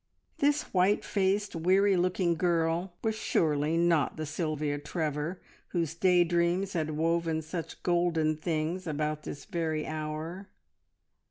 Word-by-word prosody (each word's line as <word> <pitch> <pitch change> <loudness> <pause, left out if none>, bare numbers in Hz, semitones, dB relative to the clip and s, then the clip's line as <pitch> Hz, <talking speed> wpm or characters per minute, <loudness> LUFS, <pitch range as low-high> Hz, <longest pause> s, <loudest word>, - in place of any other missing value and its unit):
This 290 +1 +3
white 190 +2 +3
faced, 200 0 0
weary 190 +4 +3
looking 180 -1 +1
girl 170 +1 0
was 220 -1 +1
surely 155 -6 +1
not 170 -4 +2
the 155 - -3
Sylvia 155 -2 -2
Trevor 150 +2 -3 0.3
whose 165 -4 0
day 180 +1 +4
dreams 175 +3 +1
had 155 -3 -1
woven 165 0 +1
such 165 +1 -6
golden 170 -3 +2
things 165 +3 -2
about 150 0 -1
this 145 - -7
very 160 -5 -2
hour. 155 +5 -5
165 Hz, 125 wpm, -29 LUFS, 155-180 Hz, 0.3 s, day